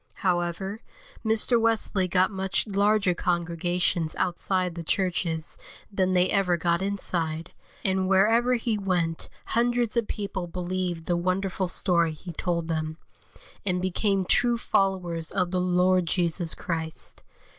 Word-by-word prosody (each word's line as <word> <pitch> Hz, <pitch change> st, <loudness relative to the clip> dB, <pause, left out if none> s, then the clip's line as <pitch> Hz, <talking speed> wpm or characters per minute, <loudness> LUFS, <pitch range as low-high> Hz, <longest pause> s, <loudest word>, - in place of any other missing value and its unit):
However, 180 Hz, +4 st, -1 dB, 0.4 s
Mr. 225 Hz, +1 st, +3 dB
Wesley 220 Hz, -4 st, +1 dB
got 185 Hz, +2 st, +2 dB
much 190 Hz, 0 st, -1 dB
larger 205 Hz, -2 st, +2 dB
congregations 175 Hz, -1 st, 0 dB
outside 180 Hz, 0 st, 0 dB
the 170 Hz, -, -6 dB
churches 170 Hz, -3 st, -1 dB, 0.3 s
than 185 Hz, -2 st, +1 dB
they 180 Hz, 0 st, +4 dB
ever 180 Hz, -3 st, +2 dB
got 170 Hz, +1 st, +1 dB
inside, 170 Hz, -4 st, -1 dB, 0.3 s
and 190 Hz, -1 st, +1 dB
wherever 225 Hz, +6 st, +4 dB
he 225 Hz, -2 st, -1 dB
went 175 Hz, -4 st, -1 dB, 0.2 s
hundreds 240 Hz, -1 st, +1 dB
of 235 Hz, -2 st, +1 dB
people 200 Hz, -4 st, -4 dB
believed 180 Hz, -1 st, -3 dB
the 175 Hz, -, +1 dB
wonderful 185 Hz, +2 st, -1 dB
story 170 Hz, -3 st, +2 dB
he 175 Hz, +3 st, -9 dB
told 170 Hz, 0 st, -2 dB
them, 155 Hz, -1 st, -2 dB, 0.7 s
and 180 Hz, -2 st, 0 dB
became 190 Hz, +1 st, 0 dB
true 240 Hz, +4 st, +3 dB
followers 180 Hz, -7 st, 0 dB
of 180 Hz, -2 st, 0 dB
the 185 Hz, -1 st, +1 dB
Lord 180 Hz, 0 st, +2 dB
Jesus 170 Hz, -1 st, 0 dB
Christ. 160 Hz, -2 st, -2 dB
185 Hz, 130 wpm, -26 LUFS, 170-195 Hz, 0.7 s, they